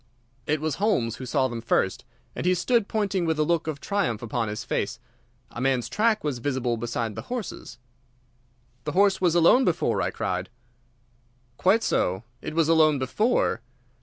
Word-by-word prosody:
It 150 Hz, +1 st, +1 dB
was 155 Hz, -2 st, -2 dB
Holmes 120 Hz, -, +1 dB
who 130 Hz, -, -7 dB
saw 130 Hz, 0 st, +2 dB
them 120 Hz, -2 st, -5 dB
first, 95 Hz, -5 st, 0 dB, 0.3 s
and -, -, -4 dB
he 185 Hz, -, +4 dB
stood 225 Hz, +4 st, +1 dB
pointing 200 Hz, -4 st, 0 dB
with 160 Hz, -2 st, 0 dB
a 155 Hz, -, +3 dB
look 165 Hz, 0 st, 0 dB
of 155 Hz, -3 st, -3 dB
triumph 140 Hz, -, -1 dB
upon 115 Hz, 0 st, -2 dB
his 105 Hz, +1 st, -4 dB
face. -, -, -2 dB, 0.5 s
A 120 Hz, -, -6 dB
man's 130 Hz, -2 st, +1 dB
track 220 Hz, +1 st, +1 dB
was 145 Hz, -5 st, -2 dB
visible 125 Hz, -2 st, -1 dB
beside 115 Hz, -1 st, -3 dB
the 110 Hz, -, -6 dB
horse's. 245 Hz, -4 st, -5 dB, 1.1 s
"The 150 Hz, -, -3 dB
horse 195 Hz, +1 st, +3 dB
was 175 Hz, -2 st, +3 dB
alone 175 Hz, +10 st, +6 dB
before," 175 Hz, -8 st, +1 dB
I -, -, 0 dB
cried. 90 Hz, +1 st, -3 dB, 1.1 s
"Quite 205 Hz, +5 st, +3 dB
so. 95 Hz, +4 st, 0 dB, 0.2 s
It -, -, -6 dB
was 165 Hz, -2 st, +3 dB
alone 155 Hz, -2 st, +4 dB
before. 210 Hz, -, +1 dB
155 Hz, 170 wpm, -25 LUFS, 120-190 Hz, 1.1 s, alone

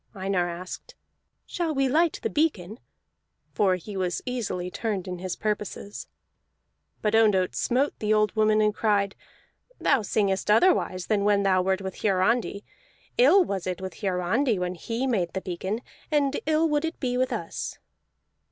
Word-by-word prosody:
Einar 190 Hz, -2 st, 0 dB
asked, 175 Hz, +2 st, -8 dB, 0.5 s
"Shall 330 Hz, -3 st, -2 dB
we 270 Hz, 0 st, +2 dB
light 320 Hz, +5 st, +2 dB
the -, -, 0 dB
beacon?" 225 Hz, -, 0 dB, 0.7 s
For 190 Hz, -3 st, +3 dB
he 195 Hz, +3 st, -8 dB
was 180 Hz, -2 st, -2 dB
easily 200 Hz, -8 st, -3 dB
turned 200 Hz, -4 st, -3 dB
in 180 Hz, -1 st, -5 dB
his 185 Hz, 0 st, -4 dB
purposes. 210 Hz, -1 st, -4 dB, 1.0 s
But 210 Hz, 0 st, +1 dB
Ondott 210 Hz, -5 st, +4 dB
smote 265 Hz, +4 st, +1 dB
the 210 Hz, 0 st, -1 dB
old 215 Hz, 0 st, +2 dB
woman, 215 Hz, 0 st, +3 dB
and 210 Hz, 0 st, +2 dB
cried: 205 Hz, -3 st, +1 dB, 0.7 s
"Thou 275 Hz, -4 st, +3 dB
singest 200 Hz, -2 st, 0 dB
otherwise 210 Hz, -, +3 dB
than 210 Hz, -2 st, +1 dB
when 205 Hz, -1 st, +3 dB
thou 190 Hz, -1 st, +3 dB
wert 190 Hz, +1 st, 0 dB
with 190 Hz, 0 st, -6 dB
Hiarandi. 205 Hz, +2 st, +1 dB, 0.6 s
Ill 320 Hz, +10 st, +7 dB
was 190 Hz, -, -3 dB
it 180 Hz, -1 st, -2 dB
with 185 Hz, -3 st, -7 dB
Hiarandi 200 Hz, +6 st, +1 dB
when 180 Hz, 0 st, -2 dB
he 230 Hz, +8 st, -3 dB
made 195 Hz, -10 st, 0 dB
the 190 Hz, -, -2 dB
beacon, 190 Hz, +5 st, -3 dB, 0.3 s
and 290 Hz, -2 st, +1 dB
ill 315 Hz, +1 st, +3 dB
would 295 Hz, -1 st, +1 dB
it 325 Hz, +1 st, -3 dB
be 250 Hz, -2 st, -1 dB
with 255 Hz, +1 st, +1 dB
us!" -, -, -4 dB
210 Hz, 160 wpm, -26 LUFS, 185-250 Hz, 1.0 s, Ill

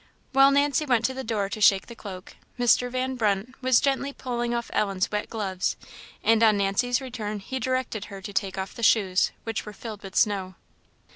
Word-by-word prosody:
While 270 Hz, 0 st, +6 dB
Nancy 285 Hz, +1 st, +2 dB
went 245 Hz, -5 st, +2 dB
to 260 Hz, -, 0 dB
the 265 Hz, 0 st, -5 dB
door 215 Hz, -4 st, -1 dB
to 215 Hz, -, -5 dB
shake 195 Hz, -2 st, +5 dB
the 235 Hz, -, -10 dB
cloak, 195 Hz, -5 st, -9 dB, 0.2 s
Mr. 245 Hz, 0 st, +3 dB
Van 255 Hz, +1 st, -2 dB
Brunt 215 Hz, 0 st, 0 dB
was 255 Hz, -2 st, +4 dB
gently 275 Hz, 0 st, 0 dB
pulling 240 Hz, -3 st, -3 dB
off 235 Hz, 0 st, -3 dB
Ellen's 195 Hz, -3 st, 0 dB
wet 210 Hz, 0 st, -2 dB
gloves, 195 Hz, -4 st, -2 dB, 0.5 s
and 225 Hz, 0 st, +4 dB
on 215 Hz, -2 st, +5 dB
Nancy's 200 Hz, +6 st, +1 dB
return 225 Hz, -5 st, -5 dB
he 260 Hz, +7 st, -5 dB
directed 255 Hz, -5 st, -2 dB
her 200 Hz, -2 st, -9 dB
to 205 Hz, +1 st, -8 dB
take 190 Hz, 0 st, -1 dB
off 190 Hz, 0 st, -4 dB
the -, -, -9 dB
shoes, 195 Hz, -5 st, +3 dB
which 225 Hz, -2 st, -3 dB
were 210 Hz, -, -9 dB
filled 215 Hz, -1 st, -8 dB
with 195 Hz, -1 st, -10 dB
snow. 190 Hz, -3 st, +1 dB
225 Hz, 200 wpm, -26 LUFS, 200-255 Hz, 0.5 s, While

